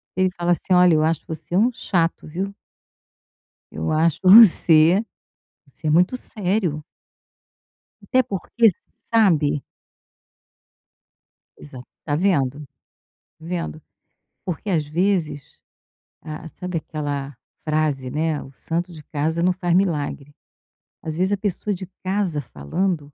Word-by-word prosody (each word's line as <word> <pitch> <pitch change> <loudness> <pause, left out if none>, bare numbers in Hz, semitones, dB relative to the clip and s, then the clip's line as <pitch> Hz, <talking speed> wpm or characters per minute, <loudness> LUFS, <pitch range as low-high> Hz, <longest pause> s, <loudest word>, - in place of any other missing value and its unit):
Ele 185 0 +2
fala 175 0 0
assim: 180 +2 0
"Olha, 180 -1 +6
eu 155 - +2
acho 160 -1 0
você 165 +1 -6
um 230 +6 +4
chato 170 -6 -1
viu." 190 +6 -4 1.2
Eu 80 +1 -3
acho 160 0 +2
você 185 -2 +7 0.6
você 155 +3 -8
é - - +2
muito 180 +10 +3
sério. 185 -9 -2 1.2
Até 255 -1 +2
porque, 210 +4 +1 0.4
sabe 155 -10 +3 2.0
Exato. 130 -4 -12 0.2
Tá 145 -2 0
vendo? 150 -6 +1 0.8
Tá 160 - -16
vendo? 170 -3 -4 0.6
Porque 180 +3 -4
às 160 -5 +1
vezes, 165 -2 -2 0.6
ah, 155 0 -8
sabe 180 +1 -5
aquela 145 -3 -5 0.3
frase, 150 -4 -1
né: 155 +1 -1
"O 135 - -13
santo 170 +6 -4
de 155 - -12
casa 160 +3 -2
não 185 - +3
faz 175 -2 -1
milagre". 150 -6 -1 0.7
Às 155 -1 -4
vezes, 185 +3 0
a 205 - +1
pessoa 205 +1 -2
de 185 0 -7 0.2
casa 185 -5 -1
falando 150 - -2
165 Hz, 120 wpm, -22 LUFS, 150-185 Hz, 2.0 s, você